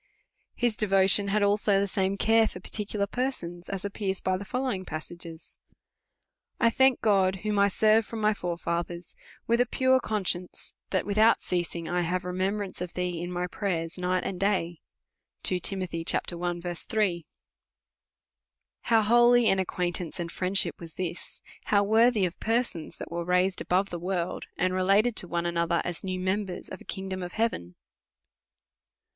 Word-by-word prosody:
His 240 -3 +1
devotion 195 -1 +4
had 205 +1 +1
also 205 0 +3
the 200 - +1
same 195 +1 -1
care 225 +1 +4
for 180 - -8
particular 205 +2 -1
persons, 200 -8 -4
as 195 0 -4
appears 195 -1 -2
by 185 - 0
the 190 - -5
following 250 -3 -2
passage. 170 +1 -7 1.3
I 230 - +4
thank 265 +1 +4
my - - -52
God, 195 -3 +3
ichom 210 -1 0
I 200 - +5
serve 215 +3 +4
from 225 +1 -7
my 215 0 +3
forefathers, 170 -1 -4 0.3
icith 235 +1 +2
a 245 - +4
pure 260 +1 +3
conscience, 185 -6 -3 0.2
that, 190 - 0
loithout 215 +3 +4
ceasing, 170 -2 -2
I 180 0 0
have 180 +2 -1
remem 185 +2 -1
brance 200 -4 -5
of 180 -1 -5
thee 180 -2 -2
in 175 +1 -4
my 180 0 -2
prayers 175 -2 -3
night 180 0 0
and 185 -2 -4
day, 180 -5 0 0.6
2 185 - +1
Tim. 190 +1 0
i. 175 0 -2
3, 175 -2 -1 1.6
How 225 -2 +3
holy 240 +1 +5
an 195 - +2
acquaintance 180 -2 -2
and 170 -1 -4
friendship 190 +1 0
was 165 -2 -11
this, 180 -1 -6 0.2
how^ 205 -1 +3
worthy 220 -1 +4
of 175 - -5
persons 225 -8 -1
that - - -8
were 170 0 -2
raised 180 +2 +1
above 190 +2 +1
the 175 - -4
world, 175 0 -3
and 185 0 +1
related 200 +5 +3
to 180 - +3
one 170 0 -2
another, 170 0 +1
as 175 -1 -4
new 185 -1 -3
members 190 0 -2
of - - -8
a - - -14
kingdom 190 -1 -5
of 175 -1 -6
heaven 150 - -2
190 Hz, 165 wpm, -27 LUFS, 175-210 Hz, 1.6 s, I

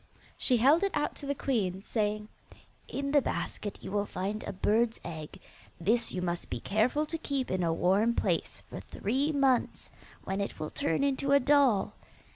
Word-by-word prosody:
She 250 - +2
held 275 +8 +5
it 400 - +2
out 295 - 0
to 285 - -7
the 280 - 0
queen, 195 -9 -1
saying, 210 -1 -1 0.6
'In 280 0 -3
the 290 -1 +5
basket 205 -4 -3
you - - -6
will 205 0 0
find 200 +3 -3
a - - -3
bird's 220 +4 +1
egg. 160 -3 -7 0.4
This 220 +8 +1
you 180 - -3
must 175 -1 -3
be 120 - -3
careful 230 - +1
to 325 +2 -4
keep 275 -4 -2
in 185 0 0
a 170 -2 +2
warm 195 +8 +2
place - - -1
for - - -7
three 270 +9 -1
months, 270 -4 +1 0.3
when 195 +1 -2
it 200 - -4
will 155 - -4
turn 165 +11 0
into 275 0 +1
a 280 - +7
doll. 275 -7 +3
225 Hz, 185 wpm, -30 LUFS, 195-275 Hz, 0.6 s, a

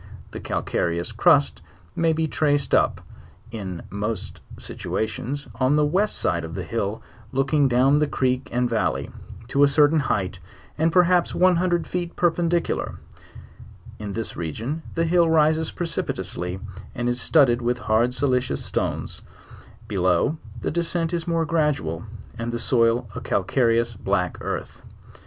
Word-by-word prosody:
The - - -6
calcareous 85 +5 -1
crust 145 +5 +3 0.3
may 165 -1 +2
be 160 0 0
traced 145 -2 0
up, - - +3 0.5
in 95 -6 -6
most 105 0 -4 0.2
situations 125 +6 -3
on 130 +3 +3
the 150 0 +3
west 195 +8 +1
side 85 -1 0
of 80 +1 -6
the 95 - -3
hill 105 +2 -3 0.3
looking 140 +2 +2
down 130 +3 +4
the 150 - +2
creek 130 -2 0
and 125 +1 +1
valley, 115 -2 -1 0.4
to 140 - +1
a 145 - +8
certain 150 +2 +4
height, 95 - -1 0.4
and 160 +2 +2
perhaps 180 0 +3
one 180 -1 +4
hundred 175 -1 +1
feet 175 -1 -4
perpendicular; 170 0 0 1.0
in 105 -2 -5
this 115 +1 -4
region 115 - -4
the 165 - +1
hill 170 0 +3
rises 160 0 +3
precipitously, 95 - -3 0.4
and 120 -1 -2
is 120 0 0
studded 120 -3 +4
with 120 +1 0
hard 120 0 +2
silicious 125 -1 0
stones; - - -3 0.7
below, 95 - +1 0.2
the - - -1
descent 170 +1 -1
is 170 -1 -2
more 165 -1 +1
gradual, 145 - 0 0.4
and 115 +1 -2
the 120 - -2
soil 115 0 +2
a - - -6
calcareous 115 +3 +1
black 95 -4 -1
earth. - - -5
130 Hz, 145 wpm, -24 LUFS, 110-160 Hz, 1.0 s, a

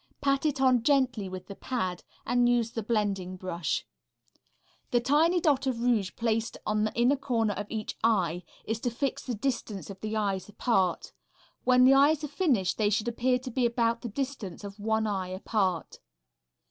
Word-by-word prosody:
Pat 275 +2 +1
it 285 -2 -1
on 255 -2 +4
gently 250 -6 +2
with 185 0 -7
the 200 - -8
pad 185 -6 -3 0.2
and 245 0 +3
use 235 -2 +2
the 225 - -3
blending 200 -4 -1
brush. 175 -2 -2 1.0
The 240 - +3
tiny 305 +8 +3
dot 285 -5 +2
of 250 -3 -1
rouge 225 -6 +2
placed 225 0 -1
in 215 0 +1
the 215 - -2
inner 245 +4 +4
corner 235 -6 0
of 205 +1 -5
each 220 -1 -4
eye 180 -7 +2 0.2
is 220 0 -2
to 245 - -1
fix 265 +4 -2
the 245 - -4
distance 210 -4 -3
of 190 -1 -11
the 215 0 -3
eyes 200 -2 -1
apart. 195 -5 0 0.5
When 250 0 +5
the 265 - +7
eyes 285 +2 +4
are - - -1
finished 265 - +1
they 210 -1 +3
should 215 +2 0
appear 250 +2 +1
to 255 0 -7
be 255 +2 0
about 235 -1 0
the 240 - -5
distance 250 -6 -5
of 200 +1 -8
one 220 +1 0
eye 195 -3 -2
apart. 185 -2 -2
230 Hz, 185 wpm, -28 LUFS, 200-255 Hz, 1.0 s, the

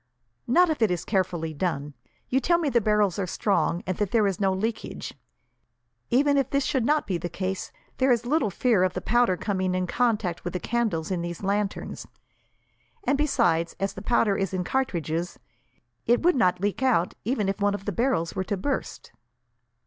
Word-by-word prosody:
"Not 345 +8 +4
if 305 - -3
it 220 - +4
is 180 -2 -2
carefully 175 -5 -1
done. 150 -3 -2 0.3
You 260 - +2
tell 340 +6 +3
me 325 -4 0
the 240 -3 +2
barrels 210 -2 +2
are 190 - -1
strong, 180 -2 0
and 185 - -2
that 210 -2 0
there 220 0 +3
is 195 -3 -1
no 195 -1 +2
leakage. 215 +4 -3 1.0
Even 285 +3 +3
if 275 -1 +1
this 275 0 +1
should 250 -4 0
not 300 0 +2
be 180 -4 -2
the 175 - -4
case, 190 +2 -4 0.3
there 260 0 +3
is 240 -1 +2
little 285 -3 +1
fear 220 +1 +2
of 185 -1 +2
the - - -1
powder 240 -6 +2
coming 185 -3 -1
in 185 0 0
contact 210 -4 0
with 175 - -4
the 180 - -2
candles 210 -9 -1
in 180 -2 -1
these 175 +2 -5
lanterns; 200 +1 -2 1.0
and 280 - +2
besides, 175 - +1
as 195 0 -1
the - - -8
powder 225 -4 +2
is 195 -1 -2
in 180 - -1
cartridges, 175 - -2 0.7
it 240 +5 +3
would 355 -1 +4
not 180 -7 +2
leak 205 +5 -1
out 240 -10 +2
even 220 -3 0
if 195 +1 -2
one 205 0 +2
of 195 - -8
the 205 - -1
barrels 230 -6 0
were 185 - -1
to 200 - -2
burst." 270 +8 -4
200 Hz, 195 wpm, -26 LUFS, 180-245 Hz, 1.0 s, Not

